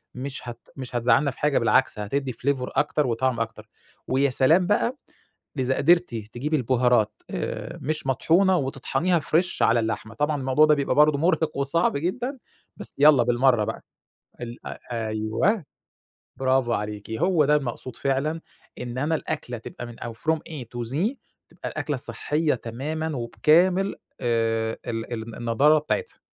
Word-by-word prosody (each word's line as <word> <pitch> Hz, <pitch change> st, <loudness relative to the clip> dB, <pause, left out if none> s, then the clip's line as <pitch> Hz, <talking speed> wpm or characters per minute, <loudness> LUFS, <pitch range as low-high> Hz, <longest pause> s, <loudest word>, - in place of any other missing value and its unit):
مش 130 Hz, -1 st, -5 dB
هت 120 Hz, 0 st, -11 dB
مش 130 Hz, -2 st, -7 dB
هتزعلنا 120 Hz, +4 st, +3 dB
في -, -, -16 dB
حاجة 150 Hz, -1 st, +2 dB
بالعكس 115 Hz, 0 st, +2 dB
هتدّي 130 Hz, +5 st, -2 dB
flavor 130 Hz, +1 st, -1 dB
أكتر 150 Hz, -1 st, +1 dB
وطعم 120 Hz, 0 st, 0 dB
أكتر، 110 Hz, -1 st, -5 dB, 0.4 s
ويا 135 Hz, +2 st, +2 dB
سلام 155 Hz, +8 st, +4 dB
بقى 235 Hz, +6 st, +1 dB, 0.6 s
إذا 130 Hz, 0 st, +1 dB
قدرتِ 170 Hz, -3 st, +3 dB
تجيبي 120 Hz, +8 st, -2 dB
البُهارات 120 Hz, -4 st, +2 dB
آآ، -, -, -4 dB
مش 155 Hz, 0 st, -3 dB
مطحونة 175 Hz, +8 st, +3 dB
وتطحنيها 135 Hz, +5 st, 0 dB
فريش 170 Hz, +4 st, 0 dB
على 115 Hz, +1 st, +4 dB
اللحمة، 110 Hz, 0 st, -3 dB
طبعًا 150 Hz, +5 st, 0 dB
الموضوع 135 Hz, +4 st, +4 dB
ده 155 Hz, 0 st, +4 dB
بيبقى 140 Hz, -1 st, 0 dB
برضو 150 Hz, 0 st, +5 dB
مُرهق 160 Hz, -1 st, +1 dB
وصعب 140 Hz, +2 st, +1 dB
جدًا 240 Hz, -, -2 dB, 0.4 s
بس 210 Hz, -, -4 dB
يالّا 145 Hz, -4 st, +7 dB
بالمَرّة 120 Hz, -1 st, +3 dB
بقى، -, -, -5 dB, 0.6 s
ال 120 Hz, 0 st, -8 dB
أ -, -, -7 dB, 0.3 s
أيوه 110 Hz, -, 0 dB, 0.7 s
برافو 130 Hz, -2 st, +2 dB
عليكِ 105 Hz, 0 st, -4 dB
هو 165 Hz, +4 st, +2 dB
ده 150 Hz, +1 st, +4 dB
المقصود 130 Hz, -3 st, -3 dB
فعلًا 140 Hz, +4 st, -1 dB, 0.4 s
إن 125 Hz, 0 st, -6 dB
أنا 150 Hz, +4 st, +1 dB
الأكلة 125 Hz, -5 st, -4 dB
تبقى 115 Hz, -, -8 dB
من 120 Hz, -1 st, -11 dB
أو 120 Hz, -, -5 dB
from 155 Hz, +8 st, 0 dB
A 150 Hz, -5 st, -6 dB
to 120 Hz, -1 st, -3 dB
Z 190 Hz, -, 0 dB, 0.3 s
تبقى -, -, -7 dB
الأكلة -, -, -3 dB
صحّيّة 150 Hz, 0 st, -1 dB
تمامًا 150 Hz, +7 st, -4 dB
وبكامل 175 Hz, +11 st, +3 dB, 0.3 s
آآ، 115 Hz, -1 st, 0 dB
ال 115 Hz, +1 st, -4 dB
الن 115 Hz, 0 st, -6 dB
النضارة 135 Hz, +7 st, +3 dB
بتاعتها. 460 Hz, -, -3 dB
135 Hz, 155 wpm, -25 LUFS, 120-155 Hz, 0.7 s, يالّا